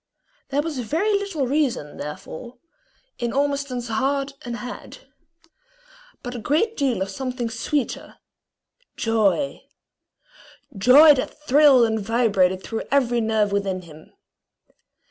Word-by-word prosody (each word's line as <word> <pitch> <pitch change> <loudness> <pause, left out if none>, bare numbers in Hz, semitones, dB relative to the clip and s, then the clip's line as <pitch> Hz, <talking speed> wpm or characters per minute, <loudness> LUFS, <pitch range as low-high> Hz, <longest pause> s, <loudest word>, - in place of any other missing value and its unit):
There 290 +1 0
was 310 -5 -4
very 320 - 0
little 395 -8 -1
reason, 255 - -1
therefore, 160 +10 -8 0.6
in 240 -1 -2
Ormiston's 280 -3 -1
head 275 +4 -1
and 240 -1 -5
heart, 250 - -9 1.2
but 245 - -5
a 245 - -5
great 335 - 0
deal 260 -9 0
of 195 - -7
something 250 +1 -4
sweeter, 245 +4 -3 0.8
joy 225 +5 0 1.1
joy 265 +10 +7
that 270 +2 -4
thrilled 280 -3 +6
and 220 -1 -1
vibrated 200 -4 +1
through 225 - -5
every 245 -4 +2
nerve 220 -2 +1
within 195 -2 -2
him. 155 -2 -15
245 Hz, 115 wpm, -23 LUFS, 220-280 Hz, 1.2 s, joy